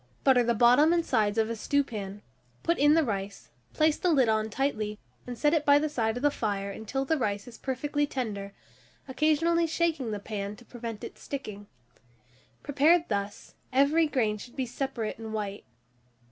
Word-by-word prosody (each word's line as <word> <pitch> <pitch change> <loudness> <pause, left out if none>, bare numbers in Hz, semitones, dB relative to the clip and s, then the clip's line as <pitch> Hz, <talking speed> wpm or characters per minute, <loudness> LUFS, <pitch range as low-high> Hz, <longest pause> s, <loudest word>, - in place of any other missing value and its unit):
Butter 260 -3 +5
the 235 0 +1
bottom 250 +8 +5
and 340 -1 +1
sides 215 -3 +1
of 220 -1 +2
a 230 - -3
stewpan, 210 -6 -2 0.4
put 340 - +1
in 295 +2 +5
the 325 - +4
rice, 200 -5 -4 0.2
place 310 -1 +2
the 360 - 0
lid 265 -8 +4
on 220 0 +1
tightly, 215 -4 -2 0.3
and 245 -1 -6
set 295 +5 +2
it 315 -3 +2
by 285 -1 +6
the 305 +1 0
side 230 -5 -1
of 245 - -6
the 290 - +4
fire 200 -5 -2
until 255 +7 -3
the 315 +2 0
rice 205 -2 -2
is 235 -2 -12
perfectly 290 +2 -1
tender, 210 -8 -4 0.6
occasionally 315 +4 +2
shaking 320 -6 0
the 210 - -2
pan 205 0 -5
to 240 - -17
prevent 230 -3 -7
its - - -9
sticking. 210 -8 -7 1.0
Prepared 310 +4 +3
thus, 200 -1 -4 0.2
every 285 +5 +3
grain 220 -7 0
should 245 +3 -11
be 260 - -1
separate 245 -3 -4
and 220 -1 -6
white. 205 -1 -4
245 Hz, 180 wpm, -28 LUFS, 215-290 Hz, 1.0 s, by